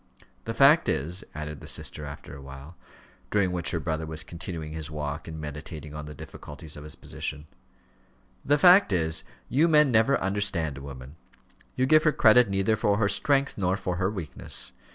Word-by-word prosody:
The 115 - -4
fact 145 +4 +6
is," 85 +8 -2
added 75 -1 -6
the - - -11
sister 75 - -1
after 70 -1 -9
awhile, 70 +4 -11 0.5
during 100 -3 +2
which 90 -1 -1
her 85 - -1
brother 80 0 -3
was 80 0 -4
continuing 85 -2 -6
his 80 -1 -5
walk 75 0 -5
and 80 -1 -7
meditating 75 0 -7
on 75 0 -7
the 75 - -9
difficulties 75 +2 -9
of 75 - -9
his 75 - -8
position 75 +1 -5 1.0
"the 145 +1 +3
fact 180 - +7
is, 80 -2 0 0.2
you 150 +6 +3
men 150 -4 +5
never 115 +4 +4
understand 95 -7 -1
a - - -11
woman; 70 +1 -10 0.6
you 130 - +2
give 155 +3 +6
her 155 - +3
credit 115 -3 +5
neither 95 +3 +1
for 105 -2 +1
her 105 -1 +2
strength, 135 +7 +1
nor 95 0 +1
for 90 -2 -3
her 95 +1 +1
weakness. 95 -7 -5
85 Hz, 180 wpm, -27 LUFS, 75-110 Hz, 1.0 s, fact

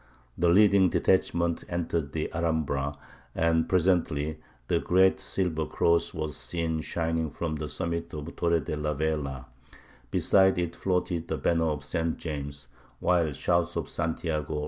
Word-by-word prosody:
The 85 0 +2
leading 100 0 +6
detachment 85 -2 +1
entered 85 -4 -2
the 80 - -3
Alhambra, 80 -4 -1 0.4
and 80 0 +2
presently 80 -5 +1 0.3
the - - +2
great 95 +1 +3
silver 80 -5 -1
cross 85 0 +2
was 75 -2 -4
seen 80 -2 -2
shining 80 -1 -1
from 80 0 -3
the 75 -1 -4
summit 85 0 -3
of 75 -1 -5
the 85 - -7
Torre 85 -1 +1
de 75 - -4
la 75 0 -2
Vela; 70 -4 -2 0.6
beside 95 +5 +4
it 85 -1 -2
floated 90 -3 -1
the - - -2
banner 85 -1 +1
of 75 -2 -3
St. 80 +2 -1
James, 70 -3 -6 0.3
while 85 -4 +2
shouts 85 +4 0
of 85 -3 -3
"Santiago!" 80 -2 -2
80 Hz, 145 wpm, -28 LUFS, 75-85 Hz, 0.6 s, leading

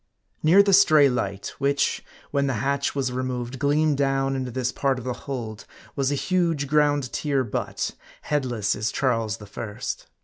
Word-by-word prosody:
Near 180 +6 +6
the 200 -1 +2
stray 155 -7 +6
light, 100 -6 -3
which, 140 +1 +1 0.3
when 140 -1 +1
the 135 - 0
hatch 140 +5 -1
was 135 -3 0
removed, 125 0 -3
gleamed 145 +1 +2
down 135 -1 +1
into 130 -1 -3
this 125 +1 -2
part 135 -2 0
of 125 - -7
the 125 - -1
hold, 115 -5 -6 0.3
was 135 -1 0
a - - +1
huge 170 -2 0
ground 145 -2 +2
tier 140 -3 0
butt, 110 - -3 0.3
headless 120 -8 0
as 110 - -2
Charles 115 -6 0
the 105 - -11
First. 105 +1 -6
135 Hz, 170 wpm, -24 LUFS, 125-145 Hz, 0.3 s, Near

